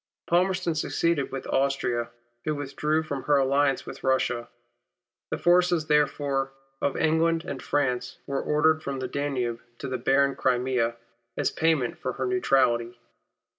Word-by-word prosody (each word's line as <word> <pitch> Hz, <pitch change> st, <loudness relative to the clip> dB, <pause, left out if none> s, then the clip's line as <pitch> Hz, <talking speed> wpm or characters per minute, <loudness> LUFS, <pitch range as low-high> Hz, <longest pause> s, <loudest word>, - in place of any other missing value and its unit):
Palmerston 180 Hz, 0 st, +1 dB
succeeded 155 Hz, -1 st, 0 dB
with 135 Hz, -, -5 dB
Austria, 135 Hz, -3 st, 0 dB, 0.3 s
who 155 Hz, -, -1 dB
withdrew 150 Hz, +2 st, -1 dB
from 140 Hz, -3 st, -4 dB
her 145 Hz, -1 st, +4 dB
alliance 140 Hz, 0 st, +2 dB
with -, -, -9 dB
Russia. 130 Hz, -2 st, 0 dB, 0.8 s
The -, -, -2 dB
forces, 175 Hz, -2 st, +3 dB
therefore, 140 Hz, -2 st, +1 dB, 0.3 s
of 140 Hz, -, 0 dB
England 165 Hz, +1 st, +2 dB
and 135 Hz, -2 st, -5 dB
France, 125 Hz, -4 st, -1 dB
were 140 Hz, -1 st, -2 dB
ordered 155 Hz, +1 st, +2 dB
from 140 Hz, -3 st, -4 dB
the 130 Hz, -1 st, -3 dB
Danube 125 Hz, -4 st, -2 dB, 0.2 s
to -, -, -6 dB
the 130 Hz, -1 st, -3 dB
barren 135 Hz, +2 st, +3 dB
Crimea, 125 Hz, -2 st, +1 dB, 0.4 s
as -, -, +1 dB
payment 160 Hz, -7 st, +1 dB
for -, -, -3 dB
her -, -, -3 dB
neutrality. 120 Hz, -, +2 dB
140 Hz, 140 wpm, -26 LUFS, 130-155 Hz, 0.8 s, her